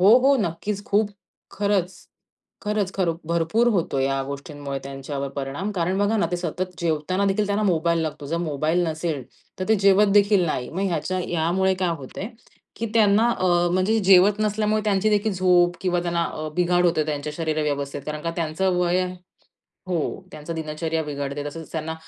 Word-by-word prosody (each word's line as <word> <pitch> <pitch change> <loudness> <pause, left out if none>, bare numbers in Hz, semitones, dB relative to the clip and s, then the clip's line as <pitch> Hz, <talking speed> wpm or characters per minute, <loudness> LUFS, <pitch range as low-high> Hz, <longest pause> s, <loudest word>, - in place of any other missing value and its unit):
हो, 205 +6 +8
हो. 275 0 +5
नक्कीच, 200 +3 -3
खूप 205 -1 +2 0.4
खरंच. 200 -3 0 0.7
खरंच, 210 -2 -1
खरं 175 -4 +1
भरपूर 170 +8 +2
होतो 165 -8 0
या 135 0 0
गोष्टींमुळे 140 0 -6
त्यांच्यावर 140 +1 -5
परिणाम. 140 +9 -3
कारण 185 0 0
बघा 205 +2 +2
ना 200 - +2
ते 175 - 0
सतत 180 +2 -3
जेवताना 170 +4 0
देखील 200 +2 +1
त्यांना 205 +1 0
मोबाईल 170 -3 +2
लागतो. 155 -2 -5
जर 165 +4 -2
मोबाईल 155 +3 0
नसेल, 155 -3 -2 0.4
तर 185 - -2
ते 220 - +5
जेवत 200 +1 +5
देखील 205 -2 +4
नाही. 125 -5 -2
मग 185 +4 -3
ह्याच्या 185 +2 -2
ह्यामुळे 175 +3 +1
काय 185 -1 0
होत 130 - -10
आहे, 205 - -3 0.5
की 230 - -2
त्यांना 215 +1 +4
अ, 185 - +1 0.3
म्हणजे 185 +5 +2
जेवत 195 +2 +6
नसल्यामुळे 215 0 +1
त्यांची 210 0 +2
देखील 210 +1 +1
झोप 180 -1 +3
किंवा 180 -2 0
त्यांना 170 -1 0
अ, 155 -1 -4
बिघाड 180 0 +2
होते 160 -3 +2
त्यांच्या 150 0 -3
शरीर 155 -2 -1
व्यवस्थेत. 140 -1 -2
कारण 150 0 -4
का 165 - -1
त्यांचं 175 +3 0
वय 180 +1 +2 0.8
हो. 180 -2 0 0.3
त्यांचा 150 +2 -6
दिनचर्या 160 +1 -2
बिघडते. 145 0 -4
तसंच 155 +2 -7
त्यांना 160 0 -3
175 Hz, 175 wpm, -23 LUFS, 155-200 Hz, 0.8 s, हो